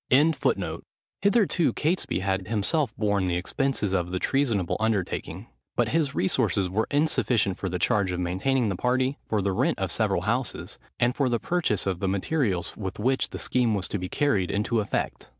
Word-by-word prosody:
] -, -, -65 dB
Hitherto 170 Hz, -, +1 dB
Catesby 160 Hz, -, 0 dB
had 95 Hz, -1 st, -1 dB
himself 115 Hz, +6 st, 0 dB
borne 100 Hz, -3 st, +1 dB
the 90 Hz, -, 0 dB
expenses 105 Hz, +2 st, -1 dB
of 90 Hz, -2 st, 0 dB
the 90 Hz, -, -2 dB
treasonable 115 Hz, -6 st, +1 dB
undertaking; 110 Hz, -5 st, -2 dB, 0.3 s
but -, -, +1 dB
his 150 Hz, -4 st, 0 dB
resources 95 Hz, 0 st, +1 dB
were 105 Hz, +5 st, -1 dB
insufficient 125 Hz, -, +1 dB
for 95 Hz, -, -2 dB
the 90 Hz, -, -2 dB
charge 95 Hz, +2 st, +1 dB
of 90 Hz, -, -3 dB
maintaining 105 Hz, +8 st, 0 dB
the 95 Hz, -, -1 dB
party, 130 Hz, +6 st, 0 dB
for 105 Hz, -3 st, 0 dB
the 100 Hz, -, +1 dB
rent 95 Hz, -, +1 dB
of -, -, -2 dB
several -, -, 0 dB
houses, -, -, -2 dB, 0.2 s
and 120 Hz, +1 st, +2 dB
for 140 Hz, -3 st, +1 dB
the 120 Hz, -1 st, +1 dB
purchase 170 Hz, -, 0 dB
of 95 Hz, -3 st, -1 dB
the 95 Hz, -, 0 dB
materials 100 Hz, -, -1 dB
with 95 Hz, -3 st, -5 dB
which 130 Hz, +5 st, +1 dB
the -, -, -6 dB
scheme 120 Hz, -4 st, +1 dB
was 95 Hz, -1 st, -2 dB
to 105 Hz, -, -2 dB
be 90 Hz, 0 st, -4 dB
carried 105 Hz, -11 st, +1 dB
into 105 Hz, +3 st, 0 dB
effect. 105 Hz, -, -3 dB
105 Hz, 185 wpm, -26 LUFS, 95-135 Hz, 0.3 s, and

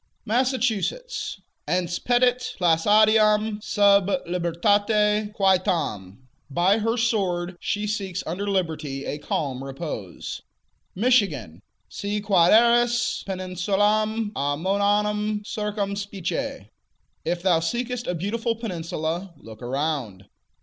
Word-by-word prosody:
Massachusetts 255 Hz, -, -1 dB, 0.3 s
Ense 175 Hz, -1 st, -1 dB
petit 250 Hz, 0 st, +1 dB
placidam 210 Hz, +4 st, +4 dB
sub 200 Hz, -1 st, +4 dB, 0.2 s
libertate 205 Hz, +5 st, +1 dB
quietam: 155 Hz, -, 0 dB, 0.2 s
By 180 Hz, +9 st, +2 dB
her 225 Hz, +2 st, 0 dB
sword 190 Hz, -6 st, 0 dB
she 205 Hz, +1 st, -2 dB
seeks 195 Hz, -3 st, -3 dB
under 185 Hz, +5 st, -3 dB
liberty 155 Hz, -7 st, -2 dB
a 145 Hz, -, -4 dB
calm 135 Hz, -3 st, -3 dB
repose. 135 Hz, -, -6 dB, 0.5 s
Michigan 180 Hz, -, +1 dB, 0.3 s
Si 205 Hz, +1 st, -3 dB
quaeris 235 Hz, +5 st, +4 dB
peninsulam 205 Hz, +4 st, 0 dB
amoeanam 205 Hz, +7 st, 0 dB
circumspice: 200 Hz, -3 st, -3 dB, 0.6 s
If 175 Hz, +1 st, -2 dB
thou 180 Hz, -4 st, +4 dB
seekest 240 Hz, +8 st, -3 dB
a 180 Hz, -, -1 dB
beautiful 225 Hz, +7 st, -2 dB
peninsula, 170 Hz, -4 st, -4 dB
look 110 Hz, 0 st, -13 dB
around. 125 Hz, -7 st, -3 dB
200 Hz, 90 wpm, -24 LUFS, 165-215 Hz, 0.6 s, placidam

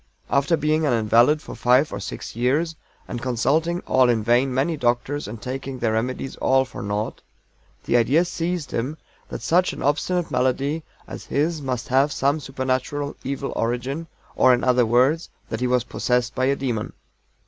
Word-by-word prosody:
After 140 Hz, +4 st, +3 dB
being 155 Hz, +1 st, +1 dB
an 145 Hz, -5 st, +2 dB
invalid 120 Hz, +7 st, +3 dB
for -, -, -8 dB
five 125 Hz, +3 st, +3 dB
or 100 Hz, -, -3 dB
six 100 Hz, -, -7 dB
years, 145 Hz, +8 st, +1 dB, 0.3 s
and 120 Hz, -, -5 dB
consulting, 150 Hz, +8 st, +1 dB
all 130 Hz, -1 st, +3 dB
in 115 Hz, -3 st, +1 dB
vain, 120 Hz, +4 st, +3 dB
many 135 Hz, +6 st, 0 dB
doctors, 130 Hz, +2 st, -1 dB
and 110 Hz, +2 st, -7 dB
taking 130 Hz, +2 st, -5 dB
their 115 Hz, -3 st, 0 dB
remedies 125 Hz, +4 st, -2 dB
all 130 Hz, 0 st, +3 dB
for 125 Hz, -, -9 dB
naught, 105 Hz, +2 st, -3 dB, 0.6 s
the -, -, 0 dB
idea 140 Hz, +9 st, +3 dB
seized 170 Hz, -2 st, -3 dB
him 130 Hz, +7 st, -2 dB, 0.3 s
that -, -, -6 dB
such 180 Hz, +2 st, +2 dB
an -, -, -7 dB
obstinate 170 Hz, +5 st, 0 dB
malady 135 Hz, +5 st, 0 dB, 0.3 s
as -, -, -8 dB
his 155 Hz, +2 st, 0 dB
must 130 Hz, 0 st, -3 dB
have 135 Hz, +3 st, +3 dB
some 140 Hz, +3 st, +1 dB
supernatural 135 Hz, +1 st, -2 dB
evil 135 Hz, +1 st, -3 dB
origin, 125 Hz, +7 st, -2 dB, 0.3 s
or 130 Hz, -1 st, +6 dB
in 120 Hz, -, -4 dB
other 125 Hz, -2 st, +3 dB
words, 130 Hz, +8 st, +2 dB, 0.2 s
that 110 Hz, -, -3 dB
he 125 Hz, -, 0 dB
was 125 Hz, -1 st, +2 dB
possessed 125 Hz, -1 st, -1 dB
by 130 Hz, -, 0 dB
a 140 Hz, +1 st, +2 dB
demon. 120 Hz, -6 st, -3 dB
130 Hz, 175 wpm, -23 LUFS, 120-150 Hz, 0.6 s, or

